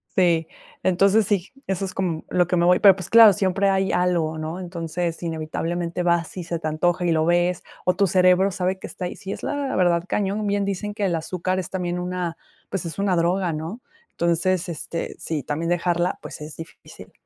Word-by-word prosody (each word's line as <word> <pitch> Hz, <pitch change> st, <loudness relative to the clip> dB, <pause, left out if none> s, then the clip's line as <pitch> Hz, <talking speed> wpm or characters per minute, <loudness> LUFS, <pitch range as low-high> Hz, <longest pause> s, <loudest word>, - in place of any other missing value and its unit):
Sí, 170 Hz, -3 st, +3 dB, 0.3 s
entonces 195 Hz, +3 st, +3 dB
sí, 200 Hz, -3 st, 0 dB, 0.2 s
eso 195 Hz, 0 st, -1 dB
es 185 Hz, -, -6 dB
como 175 Hz, -4 st, -2 dB
lo 180 Hz, -2 st, +2 dB
que 180 Hz, -, +1 dB
me 170 Hz, 0 st, +3 dB
voy 180 Hz, +1 st, +5 dB
pero 195 Hz, -2 st, +7 dB
pues 185 Hz, -3 st, -6 dB
claro, 225 Hz, -3 st, +9 dB
siempre 195 Hz, +2 st, +1 dB
hay 195 Hz, 0 st, +1 dB
algo, 170 Hz, -3 st, +1 dB
¿no? 160 Hz, +3 st, -4 dB
Entonces, 170 Hz, -1 st, -4 dB
inevitablemente 170 Hz, +1 st, -3 dB
vas 170 Hz, -1 st, 0 dB
y 180 Hz, -, -3 dB
se 170 Hz, 0 st, -3 dB
te 160 Hz, -, -4 dB
antoja 175 Hz, +3 st, 0 dB
y 170 Hz, -, +2 dB
lo 160 Hz, -1 st, +2 dB
ves, 175 Hz, +1 st, +2 dB, 0.2 s
o 180 Hz, -, +2 dB
tu 200 Hz, -, +3 dB
cerebro 185 Hz, +1 st, +4 dB
sabe 185 Hz, 0 st, -2 dB
que -, -, -7 dB
está 180 Hz, -, -6 dB
ahí 175 Hz, -, -5 dB
sí 195 Hz, -, -7 dB
es -, -, -6 dB
la 285 Hz, -2 st, -2 dB
verdad, 175 Hz, -2 st, +2 dB
cañón. 205 Hz, +1 st, -1 dB
Bien 200 Hz, 0 st, 0 dB
dicen 200 Hz, +1 st, -3 dB
que 205 Hz, -, -1 dB
el 175 Hz, -3 st, +1 dB
azúcar 180 Hz, +3 st, -2 dB
es 180 Hz, -, -5 dB
también 180 Hz, -2 st, -2 dB
una, 180 Hz, -2 st, -3 dB, 0.3 s
pues, 185 Hz, -3 st, -3 dB
es 165 Hz, -, -6 dB
una 200 Hz, -2 st, +1 dB
droga, 175 Hz, +1 st, +1 dB
¿no? 165 Hz, +10 st, -5 dB, 0.3 s
Entonces, 170 Hz, +2 st, 0 dB
este, 170 Hz, 0 st, -4 dB
eh -, -, -12 dB
sí, 155 Hz, -4 st, -3 dB
también 160 Hz, +5 st, -2 dB
dejarla, 175 Hz, +1 st, 0 dB
pues, -, -, -9 dB
es 150 Hz, +1 st, -7 dB
difícil. 165 Hz, 0 st, -12 dB
180 Hz, 210 wpm, -23 LUFS, 170-190 Hz, 0.3 s, claro